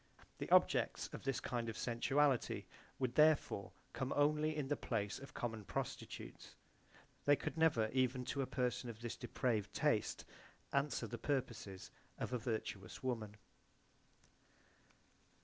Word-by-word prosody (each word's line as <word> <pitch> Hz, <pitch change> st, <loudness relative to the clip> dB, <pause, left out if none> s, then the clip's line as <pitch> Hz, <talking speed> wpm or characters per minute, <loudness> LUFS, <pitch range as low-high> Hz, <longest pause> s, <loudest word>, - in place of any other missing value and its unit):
The -, -, -4 dB
objects -, -, +4 dB
of -, -, -5 dB
this 135 Hz, -2 st, +1 dB
kind 120 Hz, -3 st, -2 dB
of 110 Hz, -, -5 dB
sensuality 135 Hz, +3 st, +2 dB, 0.3 s
would 130 Hz, -2 st, 0 dB
therefore 150 Hz, -9 st, +4 dB, 0.2 s
come 130 Hz, 0 st, -2 dB
only 150 Hz, +1 st, +3 dB
in 145 Hz, -3 st, -1 dB
the 145 Hz, -, +1 dB
place 100 Hz, -6 st, -2 dB
of 135 Hz, -, -11 dB
common 115 Hz, -3 st, -3 dB
prostitutes; -, -, -5 dB, 0.7 s
they 145 Hz, -, +7 dB
could -, -, -4 dB
never 160 Hz, -9 st, +4 dB
even 130 Hz, -1 st, +2 dB
to 140 Hz, -, -1 dB
a 130 Hz, -, -1 dB
person 125 Hz, -1 st, -1 dB
of 115 Hz, -1 st, -8 dB
this 120 Hz, -1 st, -3 dB
depraved 110 Hz, -5 st, -1 dB
taste -, -, +1 dB, 0.5 s
answer 140 Hz, -3 st, +1 dB
the 115 Hz, +1 st, -5 dB
purposes 115 Hz, -8 st, -2 dB, 0.3 s
of -, -, -3 dB
a 125 Hz, -, +1 dB
virtuous 110 Hz, -5 st, -4 dB
woman. 110 Hz, -5 st, -2 dB
125 Hz, 135 wpm, -39 LUFS, 115-140 Hz, 0.7 s, they